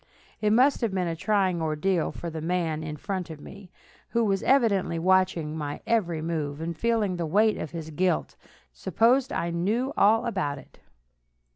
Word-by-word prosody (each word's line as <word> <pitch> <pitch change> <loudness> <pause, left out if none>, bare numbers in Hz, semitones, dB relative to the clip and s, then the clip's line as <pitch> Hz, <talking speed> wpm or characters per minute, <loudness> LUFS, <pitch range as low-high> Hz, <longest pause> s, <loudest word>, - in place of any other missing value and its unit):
It 210 - +2
must 260 +6 +4
have 220 -5 -1
been 180 -2 0
a 165 - -2
trying 185 -1 +1
ordeal 160 +3 0
for 170 - -6
the 160 0 -5
man 165 -2 -1
in 150 -1 -5
front 185 0 -4
of 160 -2 -8
me, 195 +5 -12 0.4
who 235 -1 +1
was 195 -2 +1
evidently 210 -10 +2
watching 180 -3 +1
my 145 -2 -4
every 175 -9 0
move, 155 -3 -3
and 165 +1 -4
feeling 215 -1 0
the 170 -2 -2
weight 210 +6 +2
of - - -4
his 160 -1 -7
guilt, 180 +4 0 0.4
supposed 250 +4 +2
I 170 0 -2
knew 215 +11 -1
all 225 +4 +4
about 185 -11 -2
it. - - -15
180 Hz, 175 wpm, -26 LUFS, 160-210 Hz, 0.4 s, must